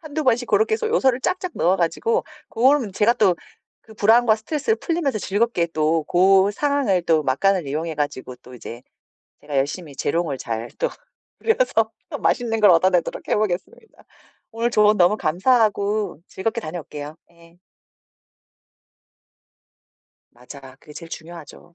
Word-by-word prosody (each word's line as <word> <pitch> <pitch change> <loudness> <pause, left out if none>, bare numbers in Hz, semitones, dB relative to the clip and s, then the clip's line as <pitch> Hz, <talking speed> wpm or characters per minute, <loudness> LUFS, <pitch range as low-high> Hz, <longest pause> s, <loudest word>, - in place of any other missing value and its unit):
1-2 310 -2 -5
번씩 245 -1 +1
고렇게 440 0 +2
해서 450 0 -2
요소를 265 - +2
쫙쫙 365 +2 -2
넣어 180 +3 +2
가지고 455 - 0 0.2
고럼 250 -3 +2
제가 210 +4 +3
또 190 -5 +2 0.5
그 220 - -16
불안과 220 +2 +4
스트레스를 300 - -2
풀리면서 325 -9 -2
즐겁게 205 -2 0
또 155 +1 +1
고 190 +4 +4
상황을 280 -7 +1
또 160 -2 +3
막간을 175 +6 +1
이용해 155 +4 -3
가지고 145 -4 -4
또 125 +1 -17
이제 120 0 -10 0.6
제가 145 -1 -4
열심히 145 +2 -3
재롱을 155 -3 -1
잘 115 -1 -5
또 - - +1 0.5
부려서 250 - +1 0.2
또 - - -5
맛있는 225 -2 0
걸 210 - +6
얻어내도록 180 +1 +1
해보겠습니다. 210 - -3 0.5
오늘 230 +1 -1
조언 210 -1 +4
너무 180 +3 +4
감사하고 205 - +1
즐겁게 225 +5 -3
다녀올게요. 155 -3 -7 0.2
예. 170 +1 -21 2.7
맞아. 130 +2 -13
그게 150 - -15
제일 165 +1 -9
중요하죠. 170 +1 -11
195 Hz, 315 characters per minute, -22 LUFS, 160-240 Hz, 2.7 s, 걸